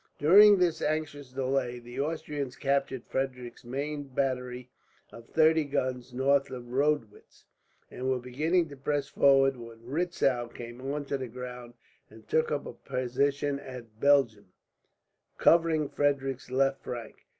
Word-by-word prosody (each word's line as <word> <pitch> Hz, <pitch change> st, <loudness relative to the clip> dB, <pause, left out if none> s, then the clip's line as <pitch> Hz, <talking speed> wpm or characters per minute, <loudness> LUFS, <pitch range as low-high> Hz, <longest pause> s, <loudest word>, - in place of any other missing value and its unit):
During 205 Hz, +7 st, +8 dB
this 175 Hz, -3 st, +1 dB
anxious 145 Hz, -3 st, -2 dB
delay 130 Hz, -1 st, -1 dB
the 120 Hz, +2 st, -9 dB
Austrians 145 Hz, -3 st, -3 dB
captured 135 Hz, -2 st, -1 dB
Frederick's 125 Hz, -3 st, -4 dB
main 145 Hz, +4 st, -4 dB
battery 125 Hz, -2 st, -3 dB, 0.4 s
of 115 Hz, 0 st, -13 dB
thirty 160 Hz, 0 st, +4 dB
guns, 130 Hz, -3 st, -2 dB
north 135 Hz, +2 st, +2 dB
of 125 Hz, -2 st, -8 dB
Rodewitz; 140 Hz, -5 st, -2 dB, 0.5 s
and 130 Hz, +1 st, -3 dB
were 130 Hz, -, +2 dB
beginning 155 Hz, +8 st, 0 dB
to 140 Hz, -, -9 dB
press 140 Hz, +1 st, -2 dB
forward, 135 Hz, -1 st, +4 dB
when 115 Hz, -1 st, -10 dB
Retzow 135 Hz, -4 st, 0 dB
came 120 Hz, +1 st, -10 dB
onto 140 Hz, +1 st, -3 dB
the 130 Hz, -1 st, -5 dB
ground 125 Hz, 0 st, -8 dB, 0.3 s
and 110 Hz, 0 st, -16 dB
took 160 Hz, 0 st, +1 dB
up 145 Hz, -1 st, -2 dB
a -, -, -7 dB
position 140 Hz, +3 st, -1 dB
at 120 Hz, -5 st, -10 dB
Belgern, 120 Hz, -8 st, +3 dB, 0.9 s
covering 165 Hz, -3 st, +4 dB
Frederick's 135 Hz, -3 st, -1 dB
left 135 Hz, +1 st, +1 dB
flank. 120 Hz, -3 st, -8 dB
135 Hz, 135 wpm, -29 LUFS, 125-145 Hz, 0.9 s, During